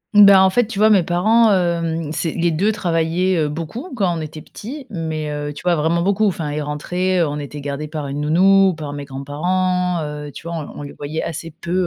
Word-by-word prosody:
Mmh. 205 0 +10
Ben, 200 -1 +8
en 190 - +5
fait, 245 +1 +2
tu 220 -4 -7
vois 215 +1 +5
mes 195 - +6
parents, 215 +7 +3
hem, 170 -4 0
c'est 160 0 -2
les 170 -1 +1
2 195 +7 +1
travaillaient, 175 -1 0
heu, 150 -2 +1
beaucoup 170 - -6
quand 190 -7 +1
on 160 - -4
était 155 0 -7
petits. 265 +5 -9
Mais, 160 -3 -3
heu, 145 0 -4
tu 145 - -10
vois, 175 -1 +3
vraiment 165 +2 +1
beaucoup. 200 +3 +2
Enfin, 160 -5 -2
ils 150 +1 -2
rentraient, 180 +5 -1
on 150 -2 -2
était 145 0 -7
gardés 145 +2 -4
par 150 -2 -5
une 140 +1 -4
nounou, 190 +5 +5
ou - - -1
par 150 -2 -6
mes 145 -1 -6
grands-parents, 180 +6 -1
heu, 150 -1 -6
tu - - -11
vois? 170 - -4
On 160 - -3
l - - -10
on - - -7
les 140 - -8
voyait 150 +2 -4
assez 165 0 -5
peu, 170 -1 -4
165 Hz, 245 wpm, -20 LUFS, 150-185 Hz, -, Mmh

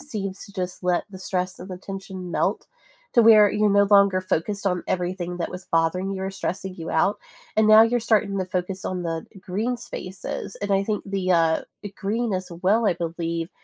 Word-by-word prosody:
seems 200 -9 -5
to 200 - -14
just 185 -2 -4
let 180 -1 +1
the 190 - -9
stress 185 -1 -2
and 180 - -9
the 180 - -6
tension 190 -2 -7
melt - - 0 0.5
to 235 - +7
where 215 -2 +7
you're 210 0 +2
no 200 0 +5
longer 200 -2 +5
focused 200 +3 -2
on 180 -2 0
everything 180 -1 -2
that 170 - -2
was 180 0 -7
bothering 165 +4 +1
you 190 -1 -4
or 190 - -2
stressing 190 0 -4
you 165 -1 -6
out, 160 +5 +2 0.4
and 220 - +4
now 215 +1 +9
you're 240 +2 +2
starting 210 -3 +1
to 190 - 0
focus 185 +1 -3
on 180 -1 -2
the 165 -1 -3
green 215 +7 -2
spaces. 190 -4 -6
And 205 - -2
I 195 0 +3
think 210 -1 -2
the, 195 -2 -2
uh 165 -2 +3 0.2
eh, - - -3
green 220 +3 -1
as 185 0 -3
well, 215 +4 +3
I 180 - +3
believe, 170 0 -3
190 Hz, 205 wpm, -24 LUFS, 180-205 Hz, 0.5 s, now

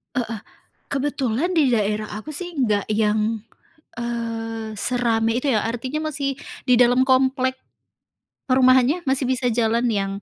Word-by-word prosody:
Heeh. 230 -4 -2 0.5
Kebetulan 280 +3 -1
di 300 -6 +3
daerah 215 -2 0
aku 305 +9 -8
sih 350 +4 -5 0.2
nggak 210 -1 0
yang, 215 +1 +1 0.6
eee, 225 -2 -4
serame 230 0 +1
itu 285 - -2
ya. 215 -2 +1
Artinya 265 +7 -3
masih 275 -1 -2 0.3
di 250 - +6
dalam 245 +1 +4
komplek, 260 0 +2 0.9
perumahannya 260 +4 +4
masih 265 0 +1
bisa 255 0 0
jalan 230 0 +1
yang, 195 -2 -1
245 Hz, 130 wpm, -22 LUFS, 225-265 Hz, 0.9 s, di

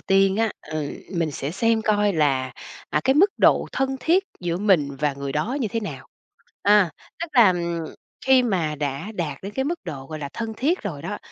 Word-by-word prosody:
tiên 195 0 +3
á, 225 0 +2 0.2
ừ, 155 -2 -3 0.2
mình 165 -3 0
sẽ 140 +1 -4
xem 225 +5 +1
coi 205 -2 +2
là, 135 -5 +1 0.4
à, - - +1
cái 265 +1 +4
mức 380 +6 +5
độ - - +4
thân 270 0 0
thiết 370 +4 +3 0.2
giữa 170 -1 -1
mình 160 -9 +2
và 150 -2 +2
người 140 0 -5
đó 210 - -1
như 225 - 0
thế 225 +3 -2
nào. 140 - -7 0.6
À, 205 -4 +5 0.3
tức 335 - -3
là, 235 -7 +7
ừm, 170 -1 -2 0.5
khi 265 -1 +6
mà 175 -10 0
đã 145 +8 -3
đạt 155 -7 -3
đến 200 +2 -6
cái 265 - 0
mức 340 +4 -2
độ, 135 -2 -6
gọi 155 +1 -6
là, 140 -2 -5
thân 225 -1 -4
thiết 325 +8 +1
rồi - - -5
đó, - - -4
190 Hz, 210 wpm, -23 LUFS, 150-230 Hz, 0.6 s, là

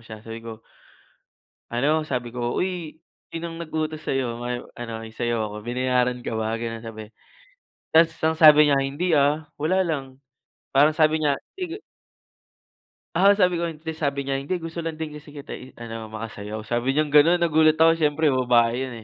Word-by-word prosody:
siya 110 -1 -12
sabi 115 0 -7
ko 115 -1 -9 1.1
ano 145 +6 +1
sabi 125 -6 -4
ko, 120 -1 -2
"Uy, 175 -4 -3 0.3
sinong 165 0 -6
nag-utos 155 -1 -3
sa'yo 120 -3 -2
may 120 0 -2 0.2
ano 115 -2 -7
isayaw 110 -2 -2
ako - - -7
binayaran 125 +1 0
ka - - -3
ba?" 110 0 -1
Gano'n 115 -1 -5
sabi, 110 -1 -9 0.8
tas 165 0 +5
ang 160 0 +1
sabi 150 -2 +8
niya, 140 - +4
"Hindi, 140 +6 -2
ah, 145 +2 +2
wala 170 +6 +1
lang." 135 -7 -3 0.5
Parang 145 +3 +6
sabi 155 0 +2
niya 145 -2 +2 0.2
"Sige" 365 0 -5 1.4
ah, 195 +3 +6
sabi 180 -3 +2
ko 170 - -1
hindi, 160 -1 -6
sabi 140 -3 -1
niya 135 0 -2
"Hindi 155 +6 -3
gusto 165 0 -6
lang 165 - -2
din 155 0 -5
kasi 150 0 -14
kita 140 -1 -10
i-ano 115 -3 -9
makasayaw." 110 -1 -6
Sabi 120 +4 -1
niyang 150 +1 +1
gano'n 155 +4 +5
nagulat 160 -2 +4
ako 165 0 +6
siyempre 155 0 +2
babae 125 -1 +2
'yun, 130 - -7
140 Hz, 165 wpm, -24 LUFS, 120-160 Hz, 1.4 s, sabi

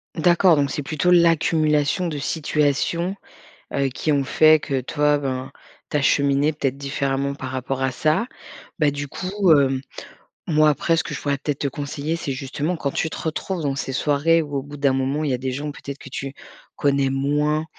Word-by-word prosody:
D'accord, 175 +1 +4
donc 140 -1 +1
c'est 145 - -2
plutôt 155 +5 0
l'accumulation 165 -1 +3
de 150 -3 -3
situations, 155 +4 0 0.6
heu, 140 -1 +1
qui 150 +4 -2
ont 140 -1 +2
fait 155 +3 +5
que, 135 -3 -1
toi, 150 +3 +1
ben, 130 -2 -4 0.4
tu - - +2
as - - 0
cheminé 140 +2 +2
peut-être 135 -3 -2
différemment 140 0 -2
par - - -6
rapport 130 0 -3
à 130 - +1
ça. 155 - +1 0.5
Beh, 150 -2 +3
du 145 0 -5
coup, 190 +3 0
heu, 135 -3 +4 0.7
moi 155 -2 +4
après, 165 +3 +1
ce - - +1
que - - -6
je - - -5
pourrais 140 -1 0
peut-être 145 -1 -3
te 140 - 0
conseiller, 145 +3 -3
c'est 150 -4 -4
justement 140 +6 -3
quand 140 - -2
tu 160 - -2
te - - -5
retrouves 165 +2 -3
dans 140 -2 -1
ces 135 -1 -4
soirées 150 +4 +2
où, 145 -2 -6
au 135 - -3
bout 145 +1 -10
d'un 140 -1 +2
moment, 135 +3 -1
il 145 - 0
y - - +1
a - - -4
des 130 +1 -3
gens 145 +3 -4
peut-être 140 -1 -8
que - - -11
tu 135 +1 -5 0.4
connais 140 -1 +2
moins, 150 +3 0
145 Hz, 200 wpm, -22 LUFS, 135-155 Hz, 0.7 s, fait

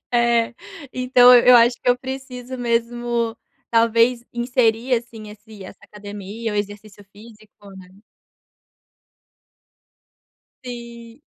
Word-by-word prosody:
É. 235 0 +1 0.4
Então, 250 0 +5
eu 245 0 +7
acho 240 +1 +4
que - - -1
eu 245 - +1
preciso 260 -1 -8
mesmo, 235 -1 -2 0.3
talvez, 230 +1 +2
inserir, 240 0 0
assim, 230 -2 -6
esse 210 -1 -14
essa 185 - -12
academia, 210 +2 -8
o - - -5
exercício 205 0 -7
físico 210 -1 -17
né. 185 -1 -13 2.8
Sim. 235 0 -10
235 Hz, 100 wpm, -20 LUFS, 215-245 Hz, 2.8 s, eu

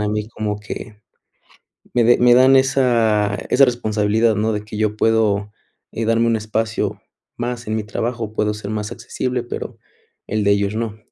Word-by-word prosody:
a 105 - 0
mí 105 0 -2
como 105 -2 -3
que 105 +1 -8 0.9
me 120 -1 +3
de 120 +2 +5
me 120 0 +5
dan 130 +2 +6
esa 115 -6 +2
esa 135 +1 +6
responsabilidad, 110 -2 +1
¿no?, 110 +2 0
de 105 0 -4
que 105 - -7
yo 105 0 0
puedo, 105 -2 +1 0.4
eh, 115 - -3
darme 115 +1 +2
un 115 - +2
espacio 110 +1 -2 0.4
más 120 -1 -4
en 110 - -1
mi 110 - -2
trabajo, 110 +1 -4
puedo 105 -1 0
ser 105 -1 -6
más 105 -1 -3
accesible, 125 +1 -3
pero - - -6 0.5
el 110 0 -1
de 100 - +3
ellos 100 +1 +1
no. 110 -1 -3
110 Hz, 180 wpm, -20 LUFS, 105-120 Hz, 0.9 s, dan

